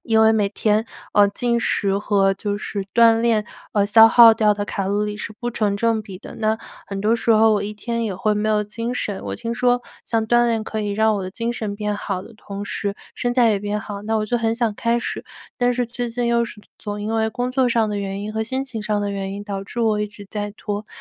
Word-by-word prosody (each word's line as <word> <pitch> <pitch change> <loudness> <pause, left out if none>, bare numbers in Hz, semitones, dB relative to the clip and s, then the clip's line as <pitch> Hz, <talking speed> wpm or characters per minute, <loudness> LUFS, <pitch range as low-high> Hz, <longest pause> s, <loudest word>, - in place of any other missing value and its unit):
因 220 -1 +3
为 220 0 +6
每 210 -2 +2
天， 215 +2 +1 0.3
呃， 205 -1 +5
进 235 +3 0
食 200 -3 +1
和 200 -2 +2
就 205 +1 -3
是 200 -1 -4
锻 230 -1 +6
炼， 225 -3 +2 0.3
呃， 205 -1 +3
消 225 +2 +7
耗 230 -1 +9
掉 215 -2 +3
的 205 0 -3
卡 195 -2 -3
路 205 +2 0
里 210 0 -3
是 215 - -6
不 240 -1 -3
成 210 -3 0
正 225 0 +1
比 195 -3 -9
的， - - -11
那 220 0 +1 0.3
很 195 0 -5
多 220 +2 +3
时 230 0 0
候 220 0 +5
我 205 - +1
一 210 +1 -5
天 235 +2 -3
也 210 -4 -2
会 210 +2 +1
没 210 +1 0
有 210 -1 +2
精 230 +4 -4
神。 205 -5 -3
我 - - -3
听 230 0 -4
说 245 0 +2 0.2
像 225 -1 0
锻 240 +1 +4
炼 225 -2 0
可 220 0 -3
以 205 -1 -2
让 220 +1 +3
我 195 - -3
的 185 - -5
精 230 +4 -2
神 210 -3 -4
变 210 -1 -2
好 195 -2 -3
的 230 - -13
同 205 -1 -7
时 200 0 -2 0.2
身 245 -1 -1
材 240 -3 +5
也 205 - +1
变 205 +1 -2
好， 205 -1 -6
那 220 +2 -1
我 215 - 0
就 240 +3 0
很 225 0 0
想 230 -3 0
开 235 +2 +1
始。 - - -4 0.4
但 245 0 +2
是 245 0 0
最 240 +1 -4
近 240 +1 -2
又 235 0 +2
是 210 -1 -11 0.2
总 205 0 -5
因 220 +2 -2
为 220 0 +1
工 245 +3 -2
作 255 -1 +2
上 230 -2 +2
的 210 -1 -2
原 195 0 -4
因 215 +1 -5
和 220 - -1
心 260 +4 -2
情 230 -5 -6
上 210 -1 0
的 200 - -1
原 195 0 -4
因 205 0 -7
导 195 -1 -4
致 235 +4 -5
我 215 -2 +2
一 210 - 0
直 205 -1 -13
在 205 -1 -3
拖， 205 0 -4
215 Hz, 285 characters per minute, -21 LUFS, 205-230 Hz, 0.4 s, 耗